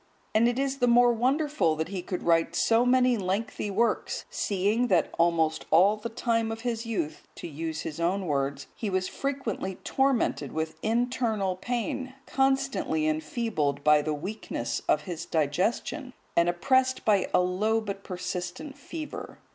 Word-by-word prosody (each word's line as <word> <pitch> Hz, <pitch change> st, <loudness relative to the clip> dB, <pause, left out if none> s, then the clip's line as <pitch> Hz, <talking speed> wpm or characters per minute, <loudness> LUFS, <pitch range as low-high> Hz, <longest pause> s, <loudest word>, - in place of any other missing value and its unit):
And 225 Hz, +2 st, +4 dB
it 240 Hz, 0 st, 0 dB
is 275 Hz, 0 st, -1 dB
the 245 Hz, -, +3 dB
more 240 Hz, 0 st, +6 dB
wonderful 265 Hz, -, +1 dB
that 160 Hz, +2 st, -3 dB
he 190 Hz, -2 st, -3 dB
could 180 Hz, 0 st, -4 dB
write 165 Hz, -1 st, +2 dB
so 230 Hz, +2 st, +3 dB
many 250 Hz, -1 st, +4 dB
lengthy 205 Hz, +2 st, -2 dB
works, 225 Hz, +4 st, 0 dB
seeing 205 Hz, +5 st, +1 dB
that 175 Hz, -8 st, +2 dB
almost 165 Hz, -2 st, +2 dB
all 190 Hz, +6 st, +5 dB
the 215 Hz, +2 st, -6 dB
time 230 Hz, -1 st, 0 dB
of 225 Hz, 0 st, -5 dB
his 230 Hz, -1 st, -3 dB
youth, 195 Hz, -9 st, -3 dB
to -, -, -7 dB
use 160 Hz, +1 st, -4 dB
his 155 Hz, -, -6 dB
own 185 Hz, +3 st, 0 dB
words, 140 Hz, -2 st, -1 dB
he 215 Hz, -, -3 dB
was 185 Hz, -1 st, 0 dB
frequently 265 Hz, -9 st, -3 dB
tormented 265 Hz, -, +1 dB
with 160 Hz, 0 st, -3 dB
internal 225 Hz, -4 st, 0 dB
pain, 255 Hz, +5 st, -3 dB
constantly 270 Hz, -, +1 dB
enfeebled 155 Hz, -, -1 dB
by 150 Hz, 0 st, +6 dB
the 155 Hz, -, -2 dB
weakness 180 Hz, -, -4 dB
of 150 Hz, -, +4 dB
his 170 Hz, +1 st, -6 dB
digestion, 185 Hz, -, -1 dB, 0.2 s
and 170 Hz, +1 st, +4 dB
oppressed 260 Hz, +8 st, +2 dB
by 205 Hz, -3 st, +3 dB
a -, -, +4 dB
low 195 Hz, +5 st, +1 dB
but 200 Hz, -2 st, -5 dB
persistent 180 Hz, -, -5 dB
fever. 315 Hz, -2 st, -7 dB
205 Hz, 155 wpm, -28 LUFS, 170-245 Hz, 0.2 s, more